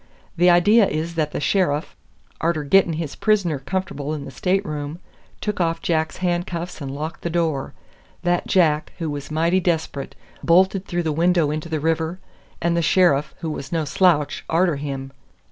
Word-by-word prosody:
The 175 +1 +4
idea 200 +5 +5
is 160 +3 -3
that 155 -2 0
the - - -3
sheriff, 155 -2 0 0.5
arter 165 -2 0
getting 175 +3 +4
his 155 -2 -4
prisoner 195 -9 +1
comf'ble 155 -2 -3
in 140 -2 -6
the 135 - -8
stateroom, 155 -2 -2 0.4
took 210 -3 -2
off 165 -1 0
Jack's 160 -2 0
handcuffs 175 -1 -2
and 140 - -4
locked 150 +4 -5
the 170 - -2
door; 160 -5 -1 0.5
that 175 0 +1
Jack, 155 -5 +2
who 165 -4 -3
was 145 -1 -6
mighty 165 +4 +2
desp'rate, 160 -5 -2 0.3
bolted 190 +3 +3
through 175 0 -1
the 160 - 0
window 165 -1 +2
into 155 +2 -4
the 160 -1 -1
river, 160 +2 -1 0.4
and 170 0 +1
the 170 - +2
sheriff, 150 -3 +3
who 160 -2 -2
was 135 -3 -6
no 165 -2 0
slouch, 150 -1 +2
arter 170 -2 +2
him. 135 -2 -5
165 Hz, 170 wpm, -22 LUFS, 150-175 Hz, 0.5 s, idea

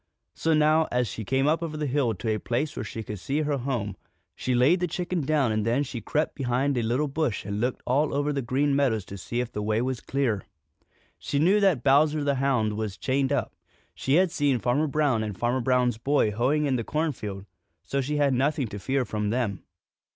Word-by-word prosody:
So 160 -1 +1
now, 155 +1 +4
as 125 -1 +1
she 110 +3 -5
came 135 +6 +1
up 160 +3 +2
over 155 -2 -4
the 150 - -2
hill 130 -5 +1
to 110 +4 -1
a 110 - -2
place 140 +8 -2
where - - -3
she 110 - -6
could 105 -1 -6
see 140 +10 -1
her 145 -2 -1
home, 120 -6 -2 0.4
she 125 - -1
laid 140 +9 +4
the 180 - 0
chicken 175 +1 -2
down 140 -4 +2
and 110 -1 0
then 120 +6 +1
she 125 -4 -6
crept 155 +1 -1
behind 135 +1 0
a 120 - +1
little 125 +7 0
bush 140 -8 -2
and 100 +1 -3
looked 125 +1 -1
all 140 +4 +2
over 145 +1 0
the 140 - -1
Green 135 +4 +1
Meadows 120 -8 +1
to 100 - -8
see 120 +6 -2
if 120 -1 -5
the 105 - -4
way 110 +1 0
was 130 0 -2
clear. 125 -8 -1 0.7
She 140 - -2
knew 185 +8 +4
that 190 - +2
Bowser 150 +2 +4
the 140 -1 +1
Hound 110 -6 +1
was 110 -3 -3
chained 135 +1 0
up. 140 - -1 0.4
She 135 - 0
had 180 0 +4
seen 145 -5 +1
Farmer 125 +6 +1
Brown 145 -6 +1
and 105 -3 -4
Farmer 120 +4 0
Brown's 125 -2 +1
boy 140 -4 +2
hoeing 130 +8 +1
in 135 -3 +1
the 115 - -2
cornfield, 110 -11 -3 0.4
so 140 - -1
she 150 +3 -2
had 140 -2 +3
nothing 140 +2 +1
to 100 - -6
fear 130 +6 0
from 105 -2 -2
them. 110 -4 -1
130 Hz, 225 wpm, -26 LUFS, 115-145 Hz, 0.7 s, now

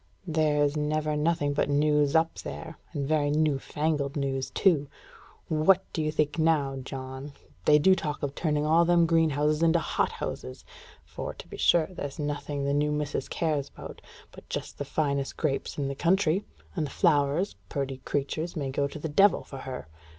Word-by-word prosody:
"There's 150 -3 +2
never 150 0 0
nothing 150 -1 +1
but 145 - 0
news 150 0 +3
up 165 0 +3
there, 160 -1 -7
and 140 -4 -3
very 150 -1 +2
new 150 -2 +2
fangled 150 -1 -1
news, 135 -2 -1
too. 160 -7 +2 0.6
What 175 +5 +4
do 160 - -1
you 155 0 0
think, 155 +1 0
now, 150 -4 +2
John? 130 +2 -7 0.3
They 150 - +7
do 190 +6 +5
talk 155 -5 -3
of 140 -1 -1
turning 150 -1 0
all 165 +2 +5
them 170 0 +4
greenhouses 155 -2 +2
into 165 0 +4
hothouses; 65 - -3 0.4
for, - - -6
to - - -11
be - - -9
sure, 170 -2 +4
there's 145 -6 -7
nothing 145 -1 -3
the 140 - +1
new 150 +1 +1
missus 150 -2 -2
cares 150 -4 -1
about - - -10 0.3
but - - -15
just - - -5
the 145 - -2
finest 140 -1 -1
grapes 145 -4 -2
in 140 -2 -1
the 140 - -2
country; 175 +4 +2 0.3
and 155 - -1
the - - -9
flowers, 150 +3 +2
purty 135 -3 -3
creatures, 145 +5 -3
may 140 -4 -2
go 140 +1 0
to 140 - -8
the 155 - -4
devil 195 +7 +4
for 135 - -9
her. 130 -6 -6
150 Hz, 180 wpm, -28 LUFS, 140-160 Hz, 0.6 s, They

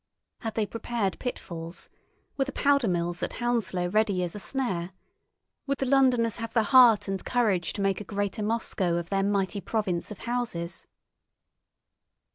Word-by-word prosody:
Had 225 -2 -5
they 220 - +1
prepared 225 -2 -2
pitfalls? 170 -8 -5 0.5
Were 270 - +1
the 275 - -5
powder 280 -4 +2
mills 175 -1 -1
at - - -2
Hounslow 225 -8 0
ready 205 -1 +1
as 175 - -3
a 210 - -6
snare? 190 -4 -2 0.7
Would 275 0 0
the 270 - -1
Londoners 255 -4 +3
have 230 -1 -5
the 225 - +3
heart 240 -3 +6
and 195 -1 -3
courage 210 -8 +1
to 200 - -2
make 195 0 +1
a - - -5
greater 205 +1 -3
Moscow 210 -5 0
of 170 0 -4
their 195 -1 +1
mighty 200 0 0
province 195 -7 -1
of 210 - -7
houses? 225 -8 -3
210 Hz, 160 wpm, -27 LUFS, 185-240 Hz, 0.7 s, heart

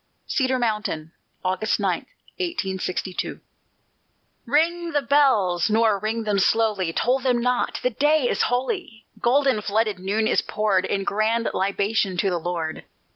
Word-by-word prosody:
CEDAR 260 -1 0
MOUNTAIN 210 -9 -2 0.3
[August 190 +4 0
9, - - +1 0.5
1862] 190 - -3 1.1
Ring 335 +5 +1
the 290 -1 +1
bells, 225 -11 +3
nor 220 -2 +3
ring 220 +2 -2
them 210 -2 +1
slowly; 205 -4 +2
Toll 250 +9 +1
them 255 -2 +1
not, 250 +1 0
the 250 - +2
day 295 +2 +2
is - - 0
holy! 250 - -2
Golden 265 -2 +2
flooded 210 -1 0
noon 205 +4 0
is - - +2
poured 200 -3 0
In 195 0 -1
grand 220 +3 0
libation 200 0 0
to 195 +1 +1
the 175 - -1
Lord. 165 -2 -4
220 Hz, 135 wpm, -23 LUFS, 195-255 Hz, 1.1 s, bells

